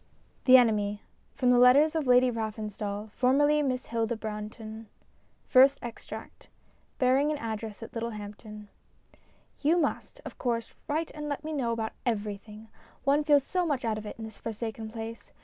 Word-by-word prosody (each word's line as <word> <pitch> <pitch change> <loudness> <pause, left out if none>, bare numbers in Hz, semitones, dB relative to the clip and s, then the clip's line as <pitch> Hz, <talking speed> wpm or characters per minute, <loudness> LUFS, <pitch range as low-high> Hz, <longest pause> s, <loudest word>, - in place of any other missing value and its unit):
VII 255 - +6
THE - - +13
ENEMY 210 -4 +2 0.3
(From 250 -1 +3
the 245 - +5
Letters 275 +5 +6
of 315 -4 -1
Lady 250 0 +5
Raffenstall> 215 -2 -4
formerly 290 +5 +3
Miss 255 -3 -1
Hilda 230 0 -1
Bruntori} 215 +1 -7 0.6
FIRST 270 +2 +6
EXTRACT 240 -1 -9 0.5
(Bearing 265 +3 +3
an 305 - -1
Address 220 -3 -5
at - - -9
Littlehamptori) 210 -2 -7 0.9
You 315 +4 +3
must, 355 - -2
of - - -9
course, 230 -2 -2
write 315 +2 -1
and 300 0 -5
let 285 +1 -3
me 315 +1 -4
know 255 -6 0
about 225 -1 -2
everything. 210 -1 -4 0.3
One 285 +2 +3
feels 290 -2 +4
so 365 +5 -1
much 285 -7 -1
out 220 -1 0
of 215 - -8
it - - -6
in 225 - -7
this 220 -2 -9
forsaken 225 0 -5
place. 225 0 -8
230 Hz, 165 wpm, -29 LUFS, 220-275 Hz, 0.9 s, THE